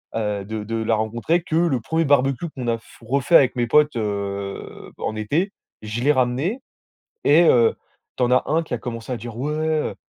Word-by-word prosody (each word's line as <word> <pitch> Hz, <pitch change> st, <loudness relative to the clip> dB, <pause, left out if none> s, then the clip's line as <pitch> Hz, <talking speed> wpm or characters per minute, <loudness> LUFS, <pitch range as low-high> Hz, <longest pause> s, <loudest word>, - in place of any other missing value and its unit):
heu, 105 Hz, -3 st, -2 dB
de 110 Hz, +1 st, -5 dB
de 115 Hz, +2 st, -4 dB
la 110 Hz, 0 st, +1 dB
rencontrer 120 Hz, +10 st, 0 dB
que 160 Hz, -, -3 dB
le 165 Hz, -8 st, +2 dB
1er 160 Hz, +7 st, 0 dB
barbecue 140 Hz, +2 st, +2 dB
qu'on 130 Hz, -5 st, -6 dB
a 115 Hz, -, +1 dB
f 115 Hz, -, -19 dB
refait 135 Hz, +7 st, +1 dB
avec 130 Hz, -4 st, +6 dB
mes 120 Hz, -1 st, +1 dB
potes, 150 Hz, +1 st, +3 dB
heu, 100 Hz, -2 st, -4 dB
bah -, -, -9 dB
en 110 Hz, -, -2 dB
été. 150 Hz, -, 0 dB, 0.3 s
Je 110 Hz, +2 st, -4 dB
l'ai 145 Hz, -, +5 dB
ramené 130 Hz, -, 0 dB, 0.6 s
et 155 Hz, +4 st, +6 dB
heu, 120 Hz, -7 st, +5 dB, 0.4 s
tu -, -, -1 dB
en 125 Hz, -, +2 dB
as 125 Hz, -, +3 dB
un 160 Hz, +3 st, +1 dB
qui 160 Hz, -, -10 dB
a -, -, -2 dB
commencé 115 Hz, 0 st, -6 dB
à -, -, -1 dB
dire: 115 Hz, 0 st, -8 dB
«Ouais, 140 Hz, +5 st, -2 dB
heu 155 Hz, 0 st, -1 dB
125 Hz, 215 wpm, -22 LUFS, 110-150 Hz, 0.6 s, avec